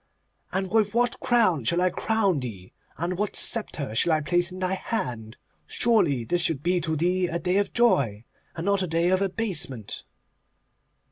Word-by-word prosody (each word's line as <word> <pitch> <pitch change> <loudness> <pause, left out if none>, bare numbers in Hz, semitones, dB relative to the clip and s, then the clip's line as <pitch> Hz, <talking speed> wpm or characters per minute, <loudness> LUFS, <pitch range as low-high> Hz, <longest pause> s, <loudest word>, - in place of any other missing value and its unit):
And 190 0 -2
with 215 -1 +1
what 245 0 +1
crown 215 - +2
shall 170 +10 +1
I 180 0 +2
crown 200 -6 0
thee, 100 -8 -8 0.2
and 175 +2 -3
what 210 0 -2
sceptre 155 - +1
shall 160 +9 +2
I 155 - +1
place 175 +3 +1
in 185 - -8
thy 185 0 -1
hand? 125 - -4 0.3
Surely 185 - +2
this 175 +9 0
should 155 -4 0
be 180 0 +1
to 160 -1 -1
thee 180 +3 +1
a 170 - -2
day 180 +2 0
of 205 - 0
joy, 140 - +2 0.3
and 165 0 -5
not 200 -1 +2
a 185 - -1
day 165 +2 +1
of 185 +1 +2
abasement. 185 - -2
180 Hz, 180 wpm, -25 LUFS, 150-200 Hz, 0.3 s, crown